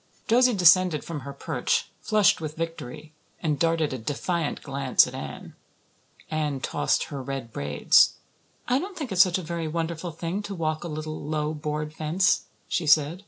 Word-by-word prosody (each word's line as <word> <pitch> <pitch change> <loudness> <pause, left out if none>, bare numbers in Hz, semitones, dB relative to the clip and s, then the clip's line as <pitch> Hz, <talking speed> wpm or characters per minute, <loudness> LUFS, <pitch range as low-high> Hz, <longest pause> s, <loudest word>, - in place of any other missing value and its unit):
Josie 250 +1 +4
descended 180 -3 +5
from 165 -3 -5
her 140 +1 -7
perch, 140 -2 -1
flushed 210 -3 +3
with 155 -1 -5
victory, 155 -2 -6 0.3
and 150 -4 -1
darted 165 -3 +1
a 130 - -4
defiant 150 +6 -2
glance 135 -2 +3
at - - -8
Anne. - - -7 0.8
Anne 150 -3 -1
tossed - - 0
her 140 -2 -5
red 130 -3 -6
braids. 70 0 +4 0.5
"I 250 +2 +2
don't 380 +4 -6
think 285 -8 -5
it's 185 -1 +5
such 185 -2 +4
a 185 - -5
very 165 0 -3
wonderful 165 +2 -3
thing 170 +4 -4
to 205 -1 -6
walk 155 -2 -2
a - - -4
little, 155 0 -5
low, 150 +1 -2
board 150 0 -4
fence," 165 +6 +1 0.2
she 170 -3 -1
said. 150 +3 +4
155 Hz, 170 wpm, -26 LUFS, 150-175 Hz, 0.8 s, descended